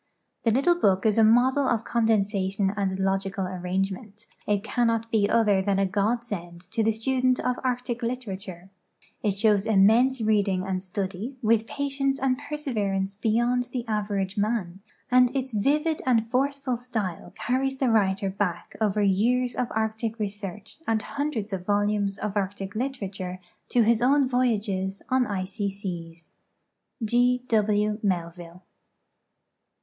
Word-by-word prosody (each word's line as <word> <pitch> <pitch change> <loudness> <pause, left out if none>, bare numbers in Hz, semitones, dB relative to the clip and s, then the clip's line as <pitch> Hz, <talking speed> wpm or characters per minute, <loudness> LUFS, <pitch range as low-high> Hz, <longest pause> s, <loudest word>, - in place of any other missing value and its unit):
The - - +5
little 270 +10 +4
book 195 - +2
is 220 0 +3
a - - +6
model 255 +5 +4
of 230 -1 +1
con 235 -1 0
densation 195 -2 +1
and 190 -2 -1
logical 195 0 -1
arrangement; 190 +4 -3 0.2
it 205 -1 +1
cannot 230 -1 0
be 205 -2 +2
other 210 -4 +3
than 195 0 +1
a 195 - +3
godsend 200 -4 -2
to 225 - 0
the 225 - +3
student 255 +3 +1
of 250 0 -1
arctic 250 -1 -2
literature; 195 -7 -5 0.5
it 200 -2 0
shows 210 -1 +3
immense 225 +6 +4
reading 205 -4 +1
and 190 -1 -2
study* 195 +6 -4
with 225 0 +3
jiatience 275 0 -1
and 260 -1 +1
perseverance 215 -10 -2
beyond 240 +4 +1
the 245 -2 -3
average 205 -2 -1
man; 200 -4 -1 0.3
and 250 0 +6
its 260 -2 -2
vivid 300 +9 +1
and 230 -2 +2
forceful 275 -1 0
style 220 -8 -4
carries 265 +3 0
the 260 -3 +1
writer 195 -2 +2
back 190 -3 -3
over 210 -1 +2
years 240 +6 +2
of 250 - -1
arctic 220 +1 -2
research 205 - -6
and 220 -2 +1
hundreds 245 -8 -3
of 185 -2 -3
volumes 205 -1 +1
of 210 -1 -4
arctic 195 -1 -3
literature 200 -7 -4 0.3
to 240 - +4
his 230 +1 +3
own 275 +2 +4
voyages 205 -6 0
on 255 -1 +2
icy 200 0 -2
seas. 170 -4 -7 0.8
O. 245 +1 +4
W. 210 -2 +1
Melviu.e. 175 -2 -3
215 Hz, 145 wpm, -26 LUFS, 195-245 Hz, 0.8 s, a